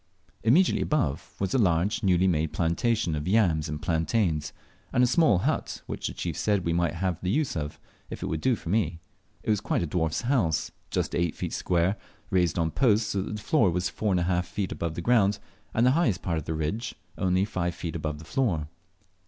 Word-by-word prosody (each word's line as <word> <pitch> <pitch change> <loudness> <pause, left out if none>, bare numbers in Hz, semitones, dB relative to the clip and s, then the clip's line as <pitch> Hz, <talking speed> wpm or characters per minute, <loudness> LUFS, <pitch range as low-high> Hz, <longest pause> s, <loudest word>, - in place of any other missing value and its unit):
Immediately 150 +12 +4
above 90 - -1
was 95 -1 -1
a 135 - +3
large 95 +1 +2
newly 95 -3 +3
made 80 -3 +1
plantation 90 +3 +1
of 75 +2 -3
yams 90 -7 +2
and 75 0 -4
plantains, 80 -2 0 0.4
and 125 - +3
a - - +7
small 140 - +4
hot, 90 - -2
which - - -4
the - - -5
chief - - -3
said 100 -4 0
we 85 - +1
might 85 -2 +1
have 90 -1 -2
the 90 - -2
use 145 +7 0
of, 75 -2 -4 0.3
if - - -6
it - - -1
would 80 -1 -2
do 130 - +3
for 85 - -8
me. 90 -5 0 0.4
It - - +1
was 105 -1 +1
quite 95 - 0
a - - 0
dwarf's 80 -1 -1
house, 115 - +1 0.2
just - - -1
eight 85 -2 0
feet - - -4
square, 90 +3 +1 0.3
raised 90 -3 +2
on 80 -1 +1
posts 110 - +2
so 100 - 0
that 105 - -4
the 105 - -6
floor 145 - +3
was 90 +1 0
four 105 -2 -1
and 90 - +2
a - - +1
half 90 0 0
feet 95 +1 -3
above 85 -1 -3
the 85 - -3
ground, 105 -2 +3 0.3
and 115 - +2
the 125 - +6
highest 130 - +1
part 85 -3 0
of 75 - -9
the 80 - -2
ridge 105 +11 -3 0.2
only 95 +1 +1
five 90 -4 -2
feet 85 -1 -5
above 75 -2 -3
the 80 - -11
flour. 85 - 0
90 Hz, 220 wpm, -27 LUFS, 80-110 Hz, 0.4 s, a